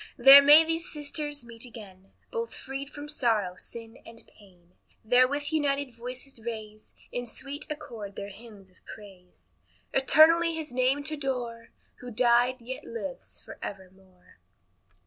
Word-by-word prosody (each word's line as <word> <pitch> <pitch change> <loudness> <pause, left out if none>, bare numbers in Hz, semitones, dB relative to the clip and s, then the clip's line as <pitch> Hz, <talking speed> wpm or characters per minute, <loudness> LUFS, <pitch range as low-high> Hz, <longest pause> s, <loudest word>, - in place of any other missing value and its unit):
There 270 +3 +10
may 295 +3 +8
these 325 +1 -2
sisters 295 -1 -4
meet 230 -1 -8
again, 195 -6 -11 0.2
Both 465 -1 -4
freed 275 +1 -6
from 290 0 -9
sorrow, 225 -11 0
sin, 225 +4 -10
and 230 0 -14
pain; 180 -4 -22 0.3
There 250 +3 +5
with 290 +3 -3
united 285 -4 0
voices 250 +2 -6
raise, 215 -2 -8 0.2
In 245 0 -4
sweet 280 +5 -7
accord 240 -10 -7
their 200 0 -6
hymns 205 -2 -14
of 185 - -29
praise; 190 -4 -14 0.4
Eternally 325 +5 +5
his 310 -5 -6
name 255 +3 +1
t' 310 +1 -3
adore, 245 -5 -4 0.3
Who 250 - -9
died, 245 +2 +3
yet 255 +3 -7
lives 470 +2 -7
forevermore. 190 - -12
245 Hz, 140 wpm, -28 LUFS, 215-290 Hz, 0.4 s, There